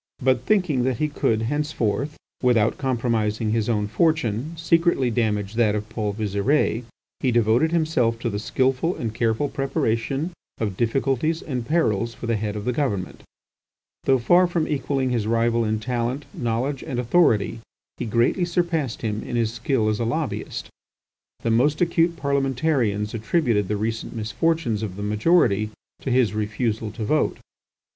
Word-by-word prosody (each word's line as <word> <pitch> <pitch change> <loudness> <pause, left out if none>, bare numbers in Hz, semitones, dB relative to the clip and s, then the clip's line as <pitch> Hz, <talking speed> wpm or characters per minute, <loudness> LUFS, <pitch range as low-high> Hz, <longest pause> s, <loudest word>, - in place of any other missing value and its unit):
But 130 0 +1
thinking 180 -11 +2
that 130 -2 0
he 155 - +1
could 115 -6 0
henceforth, 145 0 -1 0.2
without 115 -3 +2
compromising 115 -4 0
his 115 0 0
own 105 -3 +1
fortune, 150 +1 0
secretly 165 -6 +2
damage 105 -4 0
that 110 -2 +2
of 105 0 -3
Paul 110 -2 -2
Visire, 110 +4 0 0.4
he 130 - +1
devoted 120 +6 +3
himself 155 -9 +1
to 120 - -1
the 105 - -2
skilful 130 - 0
and 115 -2 -4
careful 115 +4 +1
preparation 135 +3 -1 0.3
of 105 -4 -2
difficulties 135 - 0
and 125 -5 -4
perils 115 -9 +1
for - - -7
the 115 -1 +1
Head 105 0 -2
of 105 0 -5
the 125 - 0
Government. 110 -10 -2 0.8
Though 135 - +4
far 175 +9 +4
from 170 -2 -1
equalling 135 -3 -1
his 115 -4 0
rival 115 +1 +2
in 110 0 0
talent, 125 +4 -2
knowledge, 125 +4 -2
and 135 -6 -4
authority, 115 - +2 0.4
he - - -3
greatly 120 - +2
surpassed 170 -8 -1
him 110 -1 -1
in - - -5
his 115 -1 +1
skill 120 -1 0
as 110 -1 0
a - - 0
lobbyist. 135 +6 -3 0.8
The 115 - +1
most 145 +7 +3
acute 170 -1 +2
parliamentarians 135 -7 0
attributed 115 - +1
the 105 +1 -1
recent 110 +3 -3
misfortunes 115 +2 0
of 100 -4 -4
the 100 - -5
majority 105 - +3 0.3
to - - -3
his 125 -5 +3
refusal 110 +1 -1
to 110 -2 -4
vote. 155 +8 +1
120 Hz, 155 wpm, -23 LUFS, 110-145 Hz, 0.8 s, Though